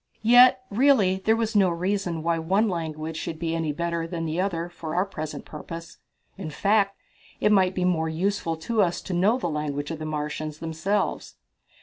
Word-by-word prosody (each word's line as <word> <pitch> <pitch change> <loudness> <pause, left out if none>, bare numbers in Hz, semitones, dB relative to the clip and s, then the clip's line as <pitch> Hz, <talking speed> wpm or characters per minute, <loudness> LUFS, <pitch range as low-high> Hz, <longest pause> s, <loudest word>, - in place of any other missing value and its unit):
Yet, 250 +3 +7
really, 215 -5 +4
there 220 - +4
was 225 -1 -2
no 195 -3 +5
reason 175 -1 -2
why 165 0 +1
one 195 +7 +2
language 160 -3 -4
should 165 0 -4
be 165 0 -2
any 160 -2 -1
better 170 +1 -2
than 165 -1 -4
the 160 +3 -1
other 175 -3 -2
for 170 -2 -7
our 180 +2 +2
present 155 -6 -6
purpose. 165 +2 -9 0.4
In 170 -5 -4
fact, 200 +4 +1 0.4
it 210 - +3
might 190 -2 +3
be 180 - 0
more 160 -3 +1
useful 165 0 -1
to 215 +7 0
us 175 -3 +1
to 190 - -5
know 195 +7 +3
the 255 - -2
language 150 -1 -3
of 160 - -5
the 155 - -5
Martians 150 0 -4
themselves. 165 +6 -2
170 Hz, 190 wpm, -25 LUFS, 160-200 Hz, 0.4 s, Yet